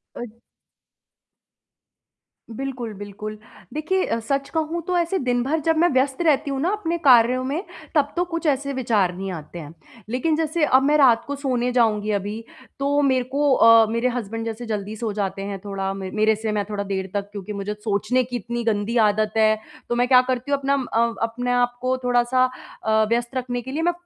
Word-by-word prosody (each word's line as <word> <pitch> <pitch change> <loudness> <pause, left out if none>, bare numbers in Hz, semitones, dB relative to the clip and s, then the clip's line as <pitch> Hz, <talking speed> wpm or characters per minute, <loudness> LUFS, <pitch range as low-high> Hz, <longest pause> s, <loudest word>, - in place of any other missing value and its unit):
अ - - -6 2.3
बिल्कुल, 260 -4 -4
बिल्कुल। 210 +1 -7 0.4
देखिए, 345 +5 0
अ, 230 - -1
सच 275 0 0
कहूँ 320 +2 -1
तो 360 -1 0
ऐसे 345 +3 0
दिनभर 250 +6 +1
जब 325 -1 +3
मैं 350 - +5
व्यस्त 270 +4 +1
रहती 290 0 +2
हूँ 270 -1 -2
ना 340 - +1
अपने 340 -5 -2
कार्यों 250 0 +6
में 290 +8 -2 0.3
तब 290 -2 +2
तो 355 - +2
कुछ 335 -1 -2
ऐसे 280 +1 -3
विचार 220 -8 +1
नहीं 190 +1 -4
आते 165 +1 -8
हैं। 160 0 -9 0.4
लेकिन 305 +5 +1
जैसे 320 0 0
अब 265 -2 +4
मैं 295 +2 +3
रात 245 -5 +5
को 285 - -3
सोने 250 -3 -1
जाऊँगी 215 -3 +2
अभी 210 +3 -6 0.3
तो 285 +1 +1
मेरे 260 -2 +2
को 290 -1 +3
अ, 230 -1 +7
मेरे 230 +2 +1
हसबैंड 225 -2 -4
जैसे 230 +1 -5
जल्दी 210 -1 -4
सो 220 -1 -3
जाते 195 -1 -3
हैं 200 -1 -4
थोड़ा 195 -1 -3
म 190 -1 -6
मेरे 220 0 +4
से 220 0 -3
मैं 205 -1 0
थोड़ा 200 -1 -2
देर 190 -1 -3
तक 200 0 -2
क्योंकि 205 0 -6
मुझे 200 +1 -4
सोचने 225 +5 +1
की 245 0 -5
इतनी 235 +1 -4
गंदी 220 +1 0
आदत 215 +1 +1
है। 215 0 +4 0.3
तो 240 - 0
मैं 245 +1 +2
क्या 255 -1 +7
करती 255 +2 -2
हूँ 280 - +2
अपना 275 +1 +1 0.2
अ 230 +1 +2
अपने 240 +2 -2
आप 245 0 +1
को 255 0 0
थोड़ा-सा 245 +1 +3 0.4
अ, 220 0 +3
व्यस्त 235 +2 -1
रखने 245 -1 -2
के 260 - -7
लिए 315 +3 -2
मैं 350 +1 +2
245 Hz, 200 wpm, -23 LUFS, 215-275 Hz, 2.3 s, अ